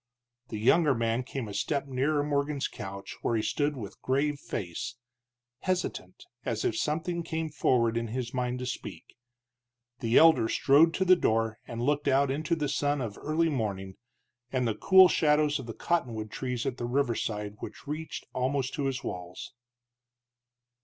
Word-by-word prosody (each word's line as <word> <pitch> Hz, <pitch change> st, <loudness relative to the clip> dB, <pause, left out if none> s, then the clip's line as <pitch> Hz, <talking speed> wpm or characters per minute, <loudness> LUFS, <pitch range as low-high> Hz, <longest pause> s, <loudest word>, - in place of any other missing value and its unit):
The 110 Hz, -, -5 dB
younger 140 Hz, +6 st, +4 dB
man 115 Hz, +1 st, 0 dB
came 130 Hz, -2 st, -5 dB
a 100 Hz, -, -7 dB
step 140 Hz, +6 st, -1 dB
nearer 140 Hz, +3 st, 0 dB
Morgan's 145 Hz, -1 st, 0 dB
couch, 100 Hz, -2 st, -7 dB
where 115 Hz, -, 0 dB
he 110 Hz, -, 0 dB
stood 145 Hz, +3 st, 0 dB
with 105 Hz, -5 st, -8 dB
grave 140 Hz, +2 st, 0 dB
face, 90 Hz, -1 st, -5 dB, 0.6 s
hesitant, 185 Hz, -, -3 dB, 0.2 s
as -, -, -2 dB
if 365 Hz, -, +1 dB
something 170 Hz, -, -1 dB
came 160 Hz, -1 st, -3 dB
forward 120 Hz, -5 st, +2 dB
in 115 Hz, 0 st, -1 dB
his 120 Hz, +1 st, -4 dB
mind 125 Hz, -1 st, -1 dB
to 125 Hz, -, -4 dB
speak. 125 Hz, -, -7 dB, 0.8 s
The 115 Hz, +1 st, +2 dB
elder 160 Hz, -9 st, +6 dB
strode 145 Hz, +6 st, +4 dB
to 190 Hz, -, +1 dB
the 185 Hz, 0 st, +7 dB
door 110 Hz, -7 st, 0 dB
and 115 Hz, 0 st, -4 dB
looked 145 Hz, +2 st, +1 dB
out 135 Hz, 0 st, +3 dB
into 155 Hz, +5 st, 0 dB
the 150 Hz, -2 st, -1 dB
sun 145 Hz, +1 st, 0 dB
of 115 Hz, -5 st, -4 dB
early 160 Hz, +2 st, +1 dB
morning, 100 Hz, -8 st, -3 dB, 0.5 s
and 125 Hz, -2 st, +1 dB
the 110 Hz, -, +1 dB
cool 190 Hz, -, +7 dB
shadows 150 Hz, -3 st, +2 dB
of 130 Hz, -, -8 dB
the 115 Hz, -, -5 dB
cottonwood 115 Hz, -11 st, -1 dB
trees 125 Hz, 0 st, -3 dB
at 130 Hz, -2 st, -2 dB
the 120 Hz, -, -3 dB
riverside 110 Hz, -5 st, -1 dB
which -, -, -9 dB
reached 155 Hz, +2 st, -5 dB
almost 130 Hz, +1 st, -1 dB
to 145 Hz, -, -2 dB
his 135 Hz, 0 st, -2 dB
walls. 90 Hz, +4 st, -6 dB
135 Hz, 165 wpm, -29 LUFS, 115-150 Hz, 0.8 s, the